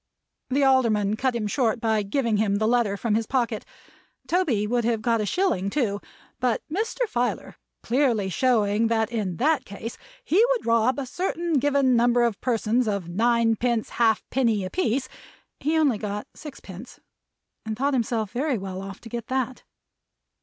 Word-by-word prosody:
The 275 +2 +2
Alderman 225 -6 +3
cut 255 +2 0
him 225 -2 -1
short 230 +1 0
by 220 -2 +1
giving 220 +2 0
him 205 -1 +1
the 215 +2 0
letter 225 -3 +2
from 225 +1 -1
his 225 0 0
pocket. 240 -4 -1 0.6
Toby 305 - +1
would 240 +2 0
have 230 -1 +1
got 230 -1 +2
a 210 - -2
shilling 200 - 0
too; 205 -5 -1 0.4
but 250 -3 0
Mr. 455 +5 -1
Filer 245 - -2 0.3
clearly 235 -5 +1
showing 220 0 +2
that 225 0 0
in 200 -7 -2
that 305 +1 +2
case 225 +3 -8 0.2
he 430 -2 +3
would 485 - -4
rob 230 +2 +2
a 280 - -3
certain 340 +2 -1
given 275 -2 +3
number 240 +1 +3
of 230 -4 -1
persons 235 0 +1
of 200 -5 -2
ninepence 230 +3 +1
half 225 -2 +3
penny 230 -7 +1
a 185 - -6
piece, 260 -7 0 0.5
he 310 +3 0
only 280 -9 +2
got 210 -1 -4
sixpence; 235 - -11 0.6
and 220 -1 -4
thought 280 +3 +1
himself 225 -4 -1
very 270 0 0
well 190 -1 -6
off 195 0 -8
to - - -11
get 235 -1 -5
that. 260 -1 -2
235 Hz, 165 wpm, -25 LUFS, 215-260 Hz, 0.6 s, Alderman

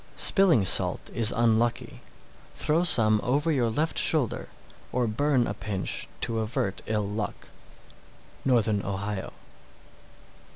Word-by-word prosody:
645. - - 0
Spilling 175 - +4
salt - - +2
is 115 -1 +3
unlucky; 115 0 0 0.5
throw 160 +3 0
some 110 -10 +4
over 145 +6 0
your 125 -6 0
left 150 +8 0
shoulder, 145 -8 +1 0.4
or 125 -1 0
burn 125 +3 0
a - - -3
pinch 95 -4 -4
to 115 -1 -1
avert 110 -3 -3
ill 105 -2 -1
luck. 105 0 -6 0.9
_Northern 110 -6 +1
Ohio. 100 0 -5
115 Hz, 120 wpm, -26 LUFS, 105-135 Hz, 0.9 s, Spilling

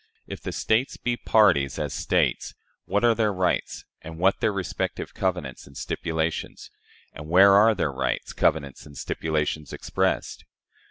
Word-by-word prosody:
If - - -8
the - - -5
States 115 +5 0
be 120 -1 -1
parties, 90 - +3
as - - -3
States, - - 0 0.3
what 100 +4 0
are 120 -1 +5
their 110 -2 +1
rights, 90 -2 -1 0.2
and 80 0 -9
what 95 +3 +2
their 110 - +1
respective 100 -3 -4
covenants 90 -9 -3
and 70 - -14
stipulations? 80 -1 -3 0.4
and 75 +1 -9
where 95 +3 +7
are 110 +2 +6
their 80 -6 -1
rights, 65 -1 -3
covenants, 70 0 -1
and 70 -2 -13
stipulations 75 0 -2
expressed? - - -2
90 Hz, 150 wpm, -25 LUFS, 75-100 Hz, 0.4 s, where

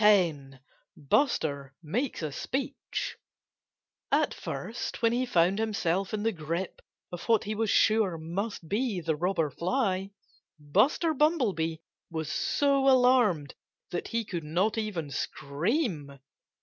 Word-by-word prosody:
X 190 -7 +6 0.6
BUSTER 140 - 0
MAKES 225 - -2
A 155 - -2
SPEECH 265 - -3 0.9
At - - +3
first, 235 +1 -5
when 230 0 +4
he 250 +1 0
found 185 -2 +3
himself 195 -4 0
in 210 -1 -2
the 225 - +2
grip 170 +1 -4 0.3
of 175 -1 -6
what 225 -2 +4
he 215 0 -3
was 220 0 0
sure 215 -5 +3
must 175 +3 -4
be 210 +1 0
the 160 -2 -1
Robber 165 -2 0
Fly, 195 - 0 0.5
Buster 210 - +2
Bumblebee 245 - +1 0.3
was 160 -2 -3
so 275 -1 +2
alarmed 245 - +4 0.4
that 175 - -3
he 230 -1 -1
could 175 -5 -4
not 180 +8 +1
even 200 -10 -3
scream. 150 - -2
195 Hz, 125 wpm, -29 LUFS, 160-230 Hz, 0.9 s, X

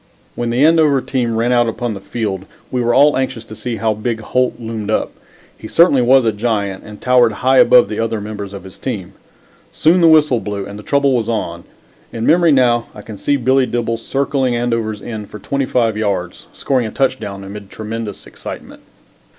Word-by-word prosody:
When 120 -1 -3
the 125 +5 +3
Andover 155 -4 +4
team 125 -3 -2
ran 115 +2 +1
out 120 -1 +3
upon 120 0 -3
the 100 - -7
field 100 -1 -4 0.3
we 125 - 0
were 120 0 +1
all 145 +2 +5
anxious 130 -3 -2
to 110 - -10
see 120 +1 -4
how 110 0 0
big 110 +2 -3
Holt 125 +3 0
loomed 110 -2 -5
up. 110 - 0 0.4
He 110 - -10
certainly 155 -1 +4
was 130 +1 +4
a 110 - +3
giant 105 -3 -2
and 105 -1 -11
towered 125 -3 +3
high 130 0 +5
above 125 0 +6
the 105 - -5
other 115 -1 -1
members 105 -1 -6
of 100 -2 -9
his 95 -1 -13
team. 100 -8 -5 0.6
Soon 175 +3 +3
the 165 - +6
whistle 150 -6 +5
blew, 100 -2 -5
and 100 +1 -9
the - - -8
trouble 140 +3 +1
was 115 -2 -1
on. 85 -7 -3 0.5
In 115 0 -4
memory 170 0 +4
now 120 -4 +3
I 105 - -10
can 110 - -9
see 145 - 0
Billy 130 +1 +2
Dibble 115 -1 -2
circling 135 +1 -1
Andover's 115 -3 -2
end 110 -3 -6
for - - -9
twenty 135 +6 -2
five 115 -3 +1
yards, 100 -5 -3
scoring 130 -4 -1
a - - -7
touchdown 110 -8 -2
amid 100 0 -9
tremendous 110 -1 -6
excitement. - - -9
115 Hz, 200 wpm, -17 LUFS, 105-130 Hz, 0.6 s, above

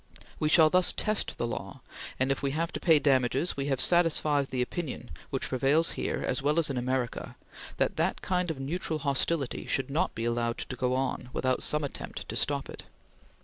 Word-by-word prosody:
We 155 - +1
shall 155 -1 +6
thus 180 0 +5
test 215 -1 0
the - - -1
law, 115 - -6 0.4
and, 130 +1 +2
if 135 - -1
we 140 - 0
have 165 +1 -1
to - - -3
pay 165 -3 +5
damages, 135 +2 +2
we 140 0 -3
have 135 -2 0
satisfied 155 -5 +3
the 125 -1 -1
opinion 130 -3 -5 0.2
which 135 - -2
prevails 140 +6 +3
here - - -3
as - - -1
well 150 +3 +1
as 160 -4 +3
in 130 - -3
America 125 0 -2 0.4
that - - 0
that - - 0
kind 180 -1 0
of 155 -4 -4
neutral 155 +3 -2
hostility 140 0 -1
should 135 0 -1
not 150 - 0
be 115 - -3
allowed 120 0 -1
to 130 - -4
go 125 0 0
on 130 -1 -2
without 130 0 0
some 150 0 +1
attempt 140 - -6
to - - -4
stop - - 0
it." - - -9
140 Hz, 200 wpm, -29 LUFS, 130-160 Hz, 0.4 s, shall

